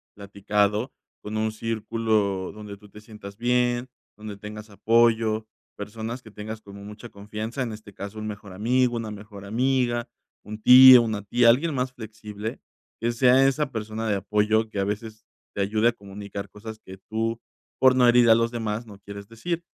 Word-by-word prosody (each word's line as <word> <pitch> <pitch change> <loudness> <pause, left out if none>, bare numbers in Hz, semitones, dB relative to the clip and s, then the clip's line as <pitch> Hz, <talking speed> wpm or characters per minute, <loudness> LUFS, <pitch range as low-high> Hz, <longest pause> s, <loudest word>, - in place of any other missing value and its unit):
platicado 105 +3 -1 0.3
con 110 +1 -5
un 110 0 0
círculo 110 -3 -1
donde 105 -1 -9
tú 105 +1 -17
te 105 - -13
sientas 105 -2 -11
bien, 120 +1 +1 0.3
donde 105 -1 -9
tengas 105 +1 -9
apoyo, 110 0 +2 0.3
personas 110 +4 -6
que 110 - -14
tengas 110 +1 -7
como 100 0 -12
mucha 105 +3 -10
confianza, 110 +5 -6
en 120 - -4
este 105 -2 -12
caso 100 +2 -8
un 110 - -5
mejor 100 -2 -8
amigo, 120 +4 +1
una 115 -2 -4
mejor 100 -1 -10
amiga, 120 +2 0 0.4
un 105 +1 -9
tío, 130 0 +10
una 110 -3 -3
tía, 120 +3 +4
alguien 145 +6 +3
más 125 -1 -2
flexible, 110 -1 -7 0.4
que 120 +1 +1
sea 130 +3 +4
esa 140 0 -1
persona 110 -1 -4
de 105 - +1
apoyo 105 +3 +1
que 100 - -5
a - - +1
veces 110 +2 -5 0.3
te 100 - -1
ayude 110 +3 +2
a - - 0
comunicar 100 -1 -8
cosas 110 +1 -10
que 95 0 -12
tú, 115 +1 -2 0.4
por 130 -1 +5
no 125 -1 +5
herir 120 -1 +5
a 110 - +8
los 115 0 +1
demás, 115 -1 -3
no 100 -2 -13
quieres 100 0 -10
decir, 165 +10 -4
110 Hz, 180 wpm, -25 LUFS, 105-120 Hz, 0.4 s, tío